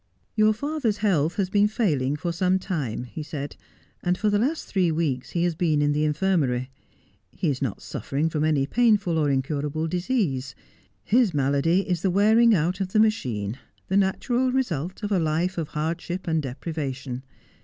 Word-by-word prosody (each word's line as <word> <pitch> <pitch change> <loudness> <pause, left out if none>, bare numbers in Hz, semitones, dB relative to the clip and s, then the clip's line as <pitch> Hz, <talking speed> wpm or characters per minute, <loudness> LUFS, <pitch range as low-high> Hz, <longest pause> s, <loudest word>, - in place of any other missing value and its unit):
'Your 215 0 +5
father's 275 -2 -1
health 175 -7 +1
has 190 -2 -1
been 205 0 +4
failing 150 - 0
for 170 +3 -3
some 185 +2 +2
time,' 155 - -3
he 125 +5 -7
said 150 -2 -6 0.5
'and 180 0 0
for 210 +2 +1
the 205 - +2
last 285 +8 0
three 180 -4 +1
weeks 150 -6 -1
he 170 - +2
has 175 -1 +1
been 160 -2 +1
in 145 0 +2
the 150 +1 +1
infirmary. 150 -6 0 0.6
He 170 - -1
is 135 -1 -2
not 130 -7 -3
suffering 145 +4 -2
from 155 -2 -1
any 150 -3 +2
painful 210 - +2
or 150 -2 +2
incurable 145 +3 -1
disease. 170 - -1 0.5
His 220 - +3
malady 140 +6 +2
is 180 -3 0
the 190 - +1
wearing 220 +4 +5
out 175 +3 0
of 185 -1 -3
the 215 - +4
machine, 125 - 0 0.3
the 190 - 0
natural 240 +6 +1
result 185 - -2
of 205 - -2
a 195 - +3
life 165 +3 0
of 160 - -2
hardship 170 +4 -3
and 160 -1 +1
deprivation. 135 -2 -4
170 Hz, 175 wpm, -25 LUFS, 145-200 Hz, 0.6 s, Your